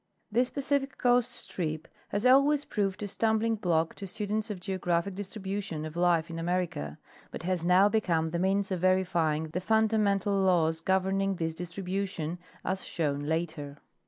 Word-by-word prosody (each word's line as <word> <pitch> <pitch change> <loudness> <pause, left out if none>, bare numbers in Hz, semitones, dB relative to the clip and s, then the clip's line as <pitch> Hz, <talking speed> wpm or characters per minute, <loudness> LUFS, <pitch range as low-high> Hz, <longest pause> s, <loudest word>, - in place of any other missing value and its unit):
This 245 +3 +2
Pacific 280 -1 -1
coast 245 -1 +3
strip 155 -3 -4 0.2
has 205 +4 -1
always 280 +3 +5
proved 200 -1 -1
a - - -2
stumbling 220 +2 +1
block 170 -6 +1
to 195 - -6
students 210 +3 -2
of 205 -3 -4
geographic 180 -1 -1
distribution 195 -4 -4
of 155 0 -7
life 175 -2 +3
in 165 - -5
America, 170 - -2 0.3
but - - -7
has 180 -1 -1
now 180 +3 +5
become 175 -7 +1
the 170 - -1
means 195 +2 +1
of 185 - 0
verifying 170 -4 +1
the 180 +4 -3
fundamental 210 -1 +2
laws 165 -4 +2
governing 190 +1 +1
this 165 -2 -2
distribution, 180 -1 -4 0.3
as 190 0 -1
shown 145 -4 -1
later. 155 -3 -2
185 Hz, 155 wpm, -29 LUFS, 165-205 Hz, 0.3 s, always